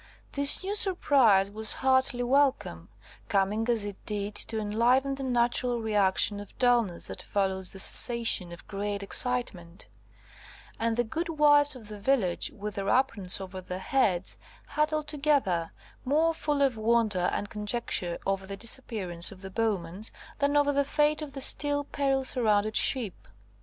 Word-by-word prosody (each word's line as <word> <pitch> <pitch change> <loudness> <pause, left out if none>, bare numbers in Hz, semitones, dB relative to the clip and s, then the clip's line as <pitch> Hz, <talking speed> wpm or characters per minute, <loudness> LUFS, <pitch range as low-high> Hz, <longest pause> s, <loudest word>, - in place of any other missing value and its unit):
This 280 +5 +3
new 400 +2 -3
surprise 270 - +3
was 220 +1 -1
heartily 260 -1 +1
welcome, 260 - 0 0.4
coming 205 +4 0
as 225 -4 +1
it 200 -1 -8
did 205 -1 -1
to 220 - 0
enliven 240 +6 +1
the 270 0 -6
natural 245 -1 0
reaction 205 -2 +1
of 205 - -12
dulness 240 -8 +1
that - - -6
follows 190 -2 -2
the - - -10
cessation 230 -3 +3
of 170 - -12
great 200 0 -4
excitement; 195 -7 -1 0.9
and 230 0 -1
the 240 - +2
good 325 +9 -4
wives 290 -2 +3
of 230 -4 -12
the 210 -1 -9
village, 200 -7 +1
with 210 +1 -6
their 195 0 -3
aprons 220 -9 +2
over 190 -1 -8
their 180 0 -6
heads, 190 -3 0 0.3
huddled 305 0 -1
together, 275 - 0 0.3
more 310 +5 +1
full 295 -3 -1
of 260 -4 +1
wonder 220 -5 +1
and 205 - -4
conjecture 210 -5 -3
over 195 0 -2
the 195 0 -7
disappearance 205 -7 +2
of 185 - -13
the 190 - -8
Bowmans, 200 -2 -2 0.3
than 285 +1 +1
over 290 0 +3
the 280 0 +2
fate 300 +2 +1
of 295 -2 -7
the 275 - -6
still 290 +1 +2
peril 275 -1 -1
surrounded 215 -5 +1
ship. 235 -8 -1
230 Hz, 155 wpm, -27 LUFS, 195-275 Hz, 0.9 s, This